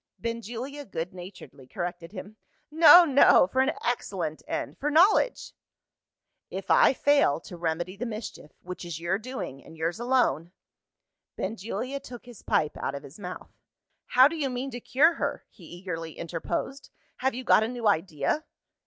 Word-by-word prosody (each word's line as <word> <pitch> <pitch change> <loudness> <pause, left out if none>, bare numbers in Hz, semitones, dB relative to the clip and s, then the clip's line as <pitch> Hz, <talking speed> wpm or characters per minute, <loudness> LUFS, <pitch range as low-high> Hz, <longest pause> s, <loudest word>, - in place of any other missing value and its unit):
Benjulia 235 +5 -5
good 180 -8 -5
naturedly 175 -7 -12
corrected 175 +2 -5
him. 205 +1 -9 0.4
"No, 330 +2 +9
no. 280 - +6
For 260 +8 0
an 265 +3 +1
excellent 185 -10 -2
end - - -4
for 295 - -1
knowledge." 380 +10 +3 1.0
"If - - -5
I - - +6
fail 280 - +3
to 175 - -10
remedy 170 +2 -3
the 245 +3 -4
mischief, 215 -8 -7
which 180 +1 -7
is 170 -3 -6
your 175 +4 -1
doing, 225 - -7
and 165 - -14
yours 165 +4 -2
alone 235 - +1 0.4
" - - -61
Benjulia 230 +6 -4
took 245 -3 -11
his 245 -4 -13
pipe 150 - 0
out 135 - -3
of 140 - -7
his 145 +8 -13
mouth. 180 -2 -8 0.6
"How 255 +2 +6
do 320 - -5
you 290 -4 -1
mean 255 +2 -4
to 245 - -6
cure 290 +8 +3
her?" - - -3
he 175 - -16
eagerly 165 -2 -6
interposed. 170 - -4 0.3
"Have 265 -1 -1
you 255 - -5
got 230 - +5
a 220 - 0
new 240 -2 -3
idea?" 165 - 0
215 Hz, 165 wpm, -27 LUFS, 170-265 Hz, 1.0 s, No